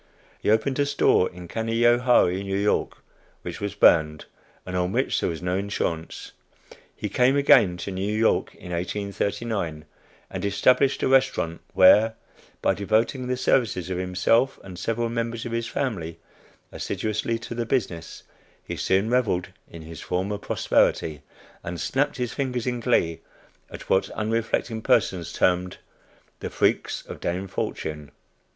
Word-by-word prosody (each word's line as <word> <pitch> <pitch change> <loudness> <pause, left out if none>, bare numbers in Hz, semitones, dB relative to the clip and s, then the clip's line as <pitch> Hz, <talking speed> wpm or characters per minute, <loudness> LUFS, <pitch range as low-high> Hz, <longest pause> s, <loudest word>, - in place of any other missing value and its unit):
He - - -1
opened 110 +6 +2
a 145 - +3
store 140 -9 +3
in 90 -1 -11
Canajoharie, 115 -2 +3
N. 100 +1 +1
Y., - - -5 0.6
which - - -6
was 100 -1 -3
burned, 75 -1 +4 0.4
and 90 - -5
on 90 0 0
which - - +1
there - - 0
was 85 +1 -5
no 90 0 0
insurance. 90 -4 -3 0.6
He - - -4
came 125 +2 +3
again 105 -10 +5
to 100 - -5
New 95 +2 -2
York 110 +1 +1
in 90 - -10
1839, 100 -2 -3 0.5
and 95 - -5
established 125 +7 +3
a - - +3
restaurant, 130 -11 +2
where, 105 +4 +6 0.5
by - - +3
devoting 115 +6 0
the 125 0 -1
services 110 -8 +1
of 90 - -2
himself 95 +8 +1
and 95 -2 -9
several 115 +2 -1
members 115 0 -3
of 120 - -5
his 115 0 -2
family 95 - -3 0.5
assiduously 110 +2 -2
to 115 +1 -7
the 115 -1 -3
business, 95 -11 -2 0.4
he - - -6
soon 95 +3 +1
reveled 110 -8 +1 0.2
in 85 -1 -10
his 80 0 -9
former 95 +3 -2
prosperity, 75 -6 +1 0.4
and 85 0 -5
snapped 135 - 0
his 125 -2 -2
fingers 125 -3 -2
in 125 -1 -1
glee 100 -9 +1 0.5
at - - -10
what 95 - +2
unreflecting 110 +1 -1
persons 95 - +1
term 90 0 +1 0.7
"the - - -5
freaks - - 0
of - - -9
Dame 90 +3 -3
Fortune." 75 -5 -4
105 Hz, 145 wpm, -25 LUFS, 90-120 Hz, 0.7 s, where